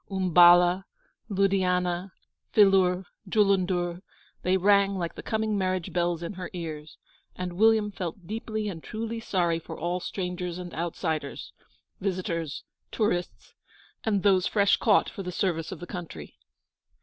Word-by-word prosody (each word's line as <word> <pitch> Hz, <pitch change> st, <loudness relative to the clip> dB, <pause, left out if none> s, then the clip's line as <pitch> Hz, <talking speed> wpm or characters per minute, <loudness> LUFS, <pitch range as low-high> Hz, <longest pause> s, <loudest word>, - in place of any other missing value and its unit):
Umballa, 180 Hz, -1 st, +5 dB, 0.4 s
Ludianah, 185 Hz, -2 st, +1 dB, 0.4 s
Phillour, 190 Hz, -3 st, +4 dB, 0.2 s
Jullundur, 185 Hz, -4 st, +1 dB, 0.4 s
they 185 Hz, +1 st, +2 dB
rang 200 Hz, +1 st, +4 dB
like 170 Hz, -2 st, -3 dB
the -, -, -8 dB
coming 220 Hz, -1 st, -1 dB
marriage 185 Hz, -2 st, -1 dB
bells 175 Hz, -1 st, 0 dB
in 170 Hz, -, -4 dB
her 180 Hz, -2 st, -6 dB
ears, 155 Hz, -3 st, -7 dB, 0.4 s
and 180 Hz, -1 st, -4 dB
William 215 Hz, +2 st, +3 dB
felt 180 Hz, -1 st, -6 dB
deeply 215 Hz, +1 st, -4 dB
and 170 Hz, -5 st, -5 dB
truly 225 Hz, +1 st, -4 dB
sorry 175 Hz, -6 st, 0 dB
for -, -, -9 dB
all 175 Hz, +2 st, -2 dB
strangers 180 Hz, -1 st, -4 dB
and 180 Hz, -1 st, -7 dB
outsiders 160 Hz, -3 st, -3 dB, 0.5 s
visitors, 175 Hz, -5 st, -3 dB, 0.3 s
tourists, 180 Hz, -5 st, -2 dB, 0.5 s
and 205 Hz, -4 st, 0 dB
those 190 Hz, -3 st, +4 dB
fresh 200 Hz, -2 st, +3 dB
caught -, -, +3 dB
for -, -, -7 dB
the 180 Hz, -1 st, -5 dB
service 170 Hz, -3 st, -1 dB
of 185 Hz, -, -7 dB
the 175 Hz, -, -7 dB
country. 170 Hz, -, -8 dB
180 Hz, 135 wpm, -27 LUFS, 175-195 Hz, 0.5 s, Umballa